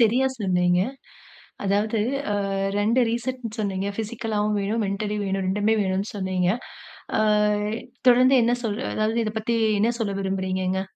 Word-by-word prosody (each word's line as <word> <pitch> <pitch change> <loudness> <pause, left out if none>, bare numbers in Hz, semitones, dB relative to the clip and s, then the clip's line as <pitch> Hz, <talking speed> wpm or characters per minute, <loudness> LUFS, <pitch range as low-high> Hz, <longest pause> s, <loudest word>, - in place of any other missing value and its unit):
சரியா 240 +4 +4
சொன்னீங்க. 180 -2 +2 0.8
அதாவது 205 +3 +1 0.5
அ - - -1 0.2
2 225 +5 +3
ரீசெட்னு 240 -1 -4
சொன்னீங்க. 195 -2 -2
பிசிக்கலாவும் 215 -1 -1
வேணும், 215 +3 -1
மென்டலி 205 +2 -2
வேணும். 195 0 -1
2 210 +3 +2
வேணும்னு 190 +1 -1
சொன்னீங்க. 185 -2 0 0.7
ஆ. - - +3 0.9
தொடர்ந்து 255 +2 +6
என்ன 235 - +2
சொல்ற 220 +2 -2
அதாவது 215 +2 +1
இத 215 - -2
பத்தி 230 +2 0 0.2
என்ன 225 +3 +3
சொல்ல 200 -3 -1
விரும்புகிறீங்கங்க? 190 -1 -1
210 Hz, 130 wpm, -24 LUFS, 190-225 Hz, 0.9 s, தொடர்ந்து